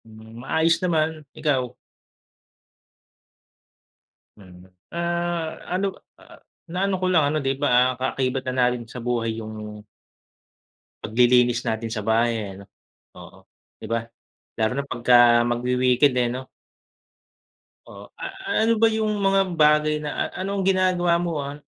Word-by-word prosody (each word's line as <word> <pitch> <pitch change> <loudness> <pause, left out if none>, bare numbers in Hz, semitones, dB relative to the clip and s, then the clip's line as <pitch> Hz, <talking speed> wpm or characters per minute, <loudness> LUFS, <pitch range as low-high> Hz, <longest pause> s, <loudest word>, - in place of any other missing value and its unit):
Hmm, 110 +1 -13
maayos 160 +5 +1
naman. 160 -3 0 0.2
Ikaw? 135 -5 0 2.6
Hmm. 90 -3 -15 0.3
Ah 170 -1 -2
ano, 185 +2 0 0.3
ah, - - -17 0.3
na 180 - -3
ano 195 - 0
ko - - 0
lang, 165 -4 +4
ano 150 +2 0
di 135 - +2
ba, 145 - +2 0.2
ah, - - -4
kaakibat 130 0 -1
na 130 - -1
natin 125 -1 0
sa 120 +1 -9
buhay 120 -1 -1
yung 105 -1 -8 1.2
paglilinis 120 +1 +3
natin 115 +1 -2
sa 110 -2 -4
bahay 115 +1 +2
eh, 100 -3 -5
'no? - - -14 0.5
Oo, - - -13 0.4
'di 110 - -8
ba? 115 0 -1 0.5
Lalo 110 0 +1
na 140 - -2
pagka 120 -2 +5
magwi-weekend 125 +2 +2
eh, 120 - +1
no? 125 +2 -4 1.5
O. - - -11
Ah, 385 - -3
ano 225 +1 +2
ba 225 - +4
yung 220 -1 -1
mga 195 -1 +3 0.2
bagay 150 0 +4
na 145 - -2
a-anong 195 +1 -3
ginagawa 185 -2 +2
mo, 170 -3 -2
ah 140 +1 -6
130 Hz, 135 wpm, -23 LUFS, 120-170 Hz, 2.6 s, pagka